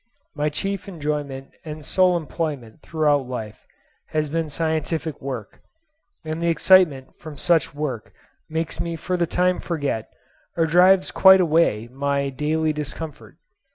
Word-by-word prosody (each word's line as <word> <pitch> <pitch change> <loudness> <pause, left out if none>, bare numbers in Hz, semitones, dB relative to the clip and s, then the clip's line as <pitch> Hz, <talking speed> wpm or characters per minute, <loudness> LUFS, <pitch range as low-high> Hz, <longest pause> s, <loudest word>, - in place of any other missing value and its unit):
My 150 0 0
chief 195 +6 -3
enjoyment 145 -6 -4
and 155 -1 -8
sole 185 -2 +3
employment 150 -7 -5
throughout 150 -4 +1
life 110 -4 -7 0.4
has 155 -1 -1
been 165 +1 -2
scientific 160 0 -2
work; 130 -6 -6 0.6
and 155 +1 -4
the 170 - 0
excitement 165 -5 +4
from 155 -2 -9
such 165 -3 +1
work 145 -6 -4 0.4
makes 160 -1 -3
me 170 0 -2
for 180 +3 -3
the 175 -1 0
time 180 +2 +1
forget, 145 -9 -3 0.5
or 165 - +3
drives 180 +3 +4
quite 190 0 +7
away, 160 -10 +2
my 140 +1 -1
daily 155 +3 0
discomfort. 150 +1 -7
155 Hz, 135 wpm, -23 LUFS, 140-170 Hz, 0.6 s, quite